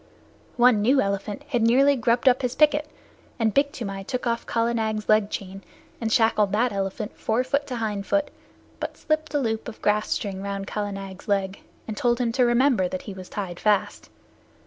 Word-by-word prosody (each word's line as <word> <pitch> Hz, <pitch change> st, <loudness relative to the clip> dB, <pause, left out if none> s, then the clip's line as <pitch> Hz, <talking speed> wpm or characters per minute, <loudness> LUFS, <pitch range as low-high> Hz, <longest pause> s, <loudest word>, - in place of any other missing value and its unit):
One 240 Hz, -3 st, +5 dB
new 260 Hz, +6 st, +4 dB
elephant 200 Hz, +4 st, -2 dB
had 245 Hz, -4 st, 0 dB
nearly 265 Hz, +5 st, +5 dB
grubbed 240 Hz, +1 st, +1 dB
up 255 Hz, 0 st, +5 dB
his 250 Hz, -1 st, -2 dB
picket, 300 Hz, 0 st, +3 dB, 0.5 s
and 225 Hz, -4 st, +1 dB
Big 285 Hz, 0 st, +2 dB
Toomai 195 Hz, -6 st, -5 dB
took 250 Hz, +5 st, -4 dB
off 235 Hz, -1 st, -1 dB
Kala 230 Hz, 0 st, +1 dB
Nag's 220 Hz, -2 st, -2 dB
leg 215 Hz, -1 st, +3 dB
chain 195 Hz, -1 st, -6 dB, 0.4 s
and 225 Hz, -1 st, -1 dB
shackled 215 Hz, -3 st, +3 dB
that 235 Hz, +3 st, +2 dB
elephant 195 Hz, +2 st, -3 dB
fore 225 Hz, +3 st, +1 dB
foot 280 Hz, +2 st, -1 dB
to 255 Hz, -, -4 dB
hind 210 Hz, -4 st, -3 dB
foot, 295 Hz, -1 st, +1 dB, 0.5 s
but -, -, -5 dB
slipped 310 Hz, 0 st, -1 dB
a -, -, +3 dB
loop 225 Hz, -3 st, -2 dB
of 235 Hz, -, -8 dB
grass 210 Hz, 0 st, +1 dB
string 195 Hz, -2 st, -2 dB
round 200 Hz, 0 st, -4 dB
Kala 205 Hz, 0 st, -3 dB
Nag's 195 Hz, -1 st, -8 dB
leg, 195 Hz, -1 st, -1 dB, 0.3 s
and 220 Hz, -, -4 dB
told 240 Hz, +2 st, +1 dB
him 240 Hz, -2 st, +1 dB
to 250 Hz, +1 st, +3 dB
remember 240 Hz, -5 st, +3 dB
that 185 Hz, +1 st, -5 dB
he 205 Hz, -, -7 dB
was 185 Hz, -1 st, -10 dB
tied 185 Hz, -4 st, -5 dB
fast. 210 Hz, -2 st, 0 dB
225 Hz, 195 wpm, -24 LUFS, 200-250 Hz, 0.5 s, One